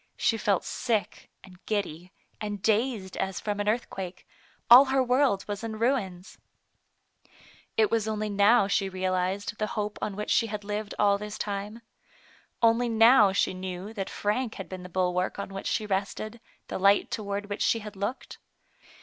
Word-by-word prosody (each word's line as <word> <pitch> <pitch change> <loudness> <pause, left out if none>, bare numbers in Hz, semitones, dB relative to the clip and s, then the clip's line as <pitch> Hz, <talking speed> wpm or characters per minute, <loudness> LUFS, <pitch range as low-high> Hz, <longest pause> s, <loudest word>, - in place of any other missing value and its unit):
She 225 - +2
felt 205 -3 +1
sick, 225 -4 -2
and 185 -1 -16
giddy, 180 -4 -3 0.3
and 210 -1 -4
dazed 215 -1 0
as 190 -1 -2
from 205 -1 -3
an 205 0 +1
earthquake; 195 -5 -4 0.4
all 250 +4 +10
her 265 0 +2
world 250 -5 +2
was 205 +1 -4
in 220 -1 -4
ruins. 215 -7 -2 1.4
It 220 -1 +3
was 225 -2 +1
only 215 -1 -2
now 205 +1 +4
she 200 -1 +1
realized 185 +2 -2
the 215 - 0
hope 210 0 -2
on 200 - -3
which 210 +1 -3
she 230 - +3
had 210 -1 -5
lived 210 0 -4
all 200 -1 +3
this 210 0 -6
time. 205 +3 -4 0.8
Only 230 +1 +4
now 225 -2 +6
she 190 - +1
knew 185 +2 -6
that 195 -3 -4
Frank 220 +3 -2
had 195 - -7
been 185 -1 -7
the 180 - -9
bulwark 180 0 0
on 200 - -5
which 195 - -5
she 215 - 0
rested, 210 +3 -3 0.3
the - - -4
light 200 +1 +4
toward 200 -1 -3
which 205 0 -5
she - - +3
had 210 -2 -8
looked. 205 +7 -5
205 Hz, 170 wpm, -27 LUFS, 195-220 Hz, 1.4 s, all